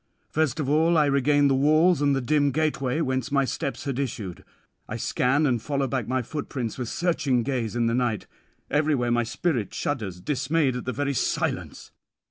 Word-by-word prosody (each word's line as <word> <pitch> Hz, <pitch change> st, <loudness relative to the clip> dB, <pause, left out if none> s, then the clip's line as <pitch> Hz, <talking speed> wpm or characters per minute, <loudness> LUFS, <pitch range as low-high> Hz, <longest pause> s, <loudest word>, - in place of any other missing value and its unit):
First 155 Hz, -3 st, 0 dB
of 145 Hz, -, -1 dB
all 160 Hz, +4 st, +3 dB
I 150 Hz, -, +5 dB
regain 145 Hz, +1 st, +3 dB
the 135 Hz, -, +3 dB
walls 155 Hz, +5 st, +4 dB
and 140 Hz, -1 st, +3 dB
the 135 Hz, -, 0 dB
dim 145 Hz, +3 st, +2 dB
gateway 150 Hz, -1 st, 0 dB
whence 130 Hz, -1 st, -1 dB
my 140 Hz, -1 st, +3 dB
steps 140 Hz, +1 st, -3 dB
had 140 Hz, -3 st, -3 dB
issued; 105 Hz, -, -4 dB, 0.5 s
I -, -, -3 dB
scan 135 Hz, +5 st, +1 dB
and 120 Hz, -5 st, +1 dB
follow 140 Hz, +2 st, -1 dB
back 130 Hz, -3 st, -2 dB
my 130 Hz, 0 st, 0 dB
footprints 130 Hz, -3 st, -4 dB
with 120 Hz, -3 st, -3 dB
searching 145 Hz, -8 st, 0 dB
gaze 120 Hz, -3 st, -2 dB
in 120 Hz, -1 st, +1 dB
the 115 Hz, -, +1 dB
night. 120 Hz, -4 st, 0 dB, 0.5 s
Everywhere 145 Hz, -4 st, +1 dB
my 120 Hz, 0 st, +3 dB
spirit 120 Hz, -, -2 dB
shudders, 105 Hz, -11 st, -3 dB
dismayed 140 Hz, -, 0 dB
at 125 Hz, -, -5 dB
the 130 Hz, -, -1 dB
very 140 Hz, +1 st, -1 dB
silence. 125 Hz, -, -2 dB
135 Hz, 185 wpm, -25 LUFS, 125-150 Hz, 0.5 s, I